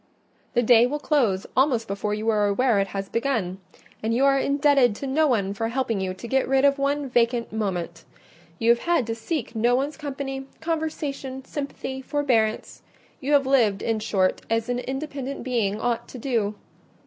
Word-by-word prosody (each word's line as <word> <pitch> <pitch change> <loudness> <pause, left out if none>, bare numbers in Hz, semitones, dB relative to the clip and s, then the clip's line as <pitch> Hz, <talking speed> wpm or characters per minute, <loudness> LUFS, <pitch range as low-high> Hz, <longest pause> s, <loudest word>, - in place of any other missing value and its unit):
The 240 - +3
day 235 0 +6
will 290 +4 -2
close 250 -11 +1
almost 255 -4 +2
before 205 +1 -2
you 215 +1 -4
are 210 -2 +3
aware 225 +1 +2
it 195 - +1
has 195 0 -4
begun; 225 -7 -1 0.4
and 225 +1 0
you 265 +3 +3
are 275 0 +4
indebted 280 -5 +3
to 275 - -6
no 300 +4 +2
one 200 -7 +1
for 225 +3 -2
helping 230 -4 -1
you 185 -1 -2
to 235 - -8
get 265 +3 +1
rid 270 +1 +3
of 280 0 +3
one 280 +1 0
vacant 235 -2 +1
moment: 180 -6 -3 0.5
you 230 +4 +4
have 235 - +3
had 340 -8 +1
to 225 - -2
seek 230 +3 -4
no 240 +2 +3
one's 280 +4 -1
company, 270 -2 -5
conversation, 295 -5 -3
sympathy, 275 -2 -5
forbearance; 255 -6 0 0.4
you 290 +1 -1
have 280 -2 +5
lived, 230 -7 +2
in 225 -1 0
short, 195 -4 +1
as 225 +1 0
an 245 0 0
independent 275 +1 -5
being 220 -5 0
ought 235 0 -1
to - - -9
do. 225 -5 -1
245 Hz, 185 wpm, -24 LUFS, 220-275 Hz, 0.5 s, day